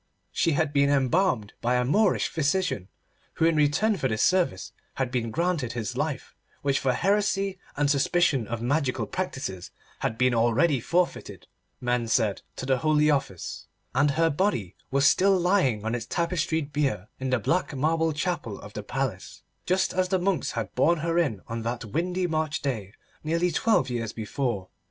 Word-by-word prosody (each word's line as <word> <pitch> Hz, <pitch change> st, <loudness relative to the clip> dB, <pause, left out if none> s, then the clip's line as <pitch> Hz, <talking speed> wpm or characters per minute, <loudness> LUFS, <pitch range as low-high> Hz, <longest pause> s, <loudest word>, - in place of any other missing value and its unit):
She 165 Hz, -, +1 dB
had 145 Hz, 0 st, 0 dB
been 140 Hz, 0 st, +3 dB
embalmed 135 Hz, -, +1 dB
by 120 Hz, +1 st, +1 dB
a 125 Hz, 0 st, +2 dB
Moorish 200 Hz, -, +2 dB
physician, 160 Hz, -, -1 dB, 0.5 s
who 165 Hz, -, +1 dB
in 165 Hz, -1 st, +3 dB
return 155 Hz, +9 st, +2 dB
for 135 Hz, -, 0 dB
this 110 Hz, -3 st, 0 dB
service 180 Hz, -, +1 dB, 0.2 s
had 130 Hz, -2 st, -1 dB
been 120 Hz, -3 st, -1 dB
granted 165 Hz, -3 st, -1 dB
his 115 Hz, -3 st, -4 dB
life, -, -, -3 dB, 0.3 s
which 140 Hz, -1 st, +2 dB
for 130 Hz, -, +1 dB
heresy 195 Hz, +3 st, +1 dB, 0.2 s
and 145 Hz, 0 st, +2 dB
suspicion 140 Hz, -3 st, +2 dB
of 120 Hz, 0 st, -4 dB
magical 140 Hz, +1 st, 0 dB
practices 135 Hz, -, -4 dB, 0.3 s
had 110 Hz, -, -2 dB
been 125 Hz, +1 st, +3 dB
already 120 Hz, +6 st, +3 dB
forfeited, 175 Hz, +9 st, -1 dB, 0.3 s
men 120 Hz, -1 st, 0 dB
said, 110 Hz, -3 st, +1 dB
to -, -, -5 dB
the 130 Hz, -1 st, +1 dB
Holy 150 Hz, 0 st, +3 dB
Office, 115 Hz, -, -3 dB, 0.3 s
and 140 Hz, +3 st, +3 dB
her 165 Hz, +3 st, +2 dB
body 140 Hz, -, -1 dB
was 140 Hz, +1 st, +2 dB
still 190 Hz, +5 st, +4 dB
lying 170 Hz, -, +2 dB
on 110 Hz, -, -1 dB
its 120 Hz, -1 st, -3 dB
tapestried 165 Hz, -3 st, -1 dB
bier 130 Hz, -10 st, 0 dB
in 130 Hz, 0 st, -2 dB
the 130 Hz, -, +3 dB
black 155 Hz, -, 0 dB
marble 160 Hz, +3 st, +1 dB
chapel 155 Hz, -, -3 dB
of 105 Hz, -, -11 dB
the 105 Hz, -, -5 dB
Palace, 120 Hz, -3 st, -4 dB, 0.2 s
just 185 Hz, +1 st, +1 dB
as 185 Hz, 0 st, +1 dB
the 190 Hz, -, +2 dB
monks 185 Hz, 0 st, 0 dB
had -, -, -4 dB
borne 170 Hz, -2 st, +2 dB
her 170 Hz, +1 st, +1 dB
in 125 Hz, -, 0 dB
on 115 Hz, 0 st, -4 dB
that 115 Hz, +1 st, -3 dB
windy 180 Hz, -, -1 dB
March 155 Hz, -2 st, -1 dB
day 110 Hz, -9 st, -3 dB, 0.3 s
nearly 170 Hz, +3 st, +1 dB
twelve 225 Hz, +7 st, +2 dB
years 115 Hz, -3 st, -3 dB
before. 110 Hz, -3 st, -3 dB
145 Hz, 175 wpm, -26 LUFS, 120-170 Hz, 0.5 s, still